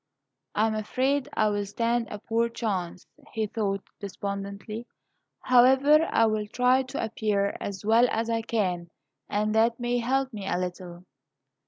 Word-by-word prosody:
"I 215 - +3
am 220 - 0
afraid 255 +6 0
I 215 -1 +3
will 205 -1 -2
stand 230 +3 0
a 210 - -5
poor 230 +2 0
chance," 195 -7 -3 0.3
he 220 -1 0
thought, 200 -2 -2 0.2
despondently; 200 +3 -6 0.5
"however, 265 +5 +5
I 230 - +4
will 215 -1 0
try 250 +4 +3
to 265 +2 -4
appear 210 -2 -1
as 200 0 -6
well 230 +3 +5
as 225 +1 -1
I 230 -1 0
can, 185 -7 -1 0.4
and 210 +1 0
that 230 +2 +2
may 245 0 0
help 260 +2 0
me 200 -2 -6
a 180 - 0
little." 180 -1 -6
220 Hz, 155 wpm, -27 LUFS, 200-240 Hz, 0.5 s, however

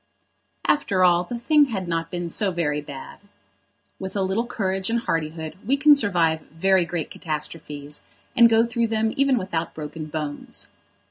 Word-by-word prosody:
After 195 -10 +2
all, 175 0 +4
the 240 - -4
thing 295 +5 +4
had 195 -8 -4
not 165 -1 -2
been 175 0 -3
so 200 +4 0
very 155 -5 -1
bad. 140 -2 -9 0.8
With 190 0 -6
a 195 - +1
little 200 +6 0
courage 190 -4 -1
and 235 0 +1
hardihood 160 -3 -3
we 270 +6 +2
can 295 +1 +7
survive 175 - +2
very 185 +2 +2
great 170 -2 -4
catastrophes, 150 -2 -5 0.3
and 235 -2 +7
go 225 0 +4
through 235 0 0
them 220 0 0
even 275 -2 +3
without 170 -5 -3
broken 155 0 -6
bones. 150 -1 -5
185 Hz, 160 wpm, -24 LUFS, 160-225 Hz, 0.8 s, can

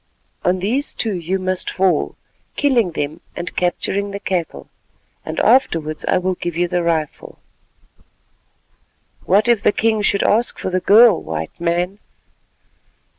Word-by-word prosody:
On 180 +1 +2
these 230 +10 -1
two 220 -3 -1
you 180 +1 -2
must 185 -1 -3
fall, 185 -5 0 0.4
killing 240 - +1
them 155 +2 -4
and 175 - -6
capturing 195 +3 -1
the 200 0 -6
cattle, 180 -4 -3 0.6
and - - -4
afterwards 165 - +2
I - - +2
will 185 +1 0
give 175 -2 -5
you 175 0 +1
the 175 0 -1
rifle." 160 -3 -2 1.9
"What 205 +4 +3
if 235 -4 +3
the - - +3
king 220 0 +1
should 200 -1 +1
ask 230 +3 +1
for 185 - -4
the 185 - +1
girl, 215 +1 +6
White 80 0 -5
Man?" 175 +3 -1
185 Hz, 140 wpm, -19 LUFS, 170-205 Hz, 1.9 s, girl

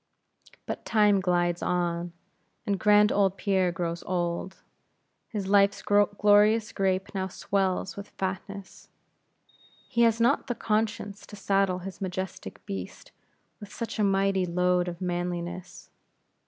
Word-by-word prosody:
But - - -5
time 210 -3 +3
glides 175 -2 +1
on, 175 -1 -1 0.5
and 200 -3 -1
grand 210 +1 +5
old 195 -1 +2
Pierre 190 -3 +1
grows 170 0 -3
old: 175 0 -3 0.7
his 205 -3 -3
life's 200 0 +3
glorious 205 +2 +4
grape 190 0 -1
now 190 -1 -2
swells 190 0 -1
with 200 0 -8
fatness; 190 +1 -6 1.0
he 235 - 0
has 230 -1 +4
not 245 +5 +2
the 245 - -2
conscience 215 -2 -2
to - - -10
saddle 195 -2 +1
his 195 -1 -8
majestic 185 - -5
beast 95 -2 -7 0.5
with 205 0 -11
such 230 -1 -5
a - - +3
mighty 195 -1 +2
load 180 +1 +1
of 175 0 -6
manliness. 175 0 -4
195 Hz, 125 wpm, -27 LUFS, 180-205 Hz, 1.0 s, grand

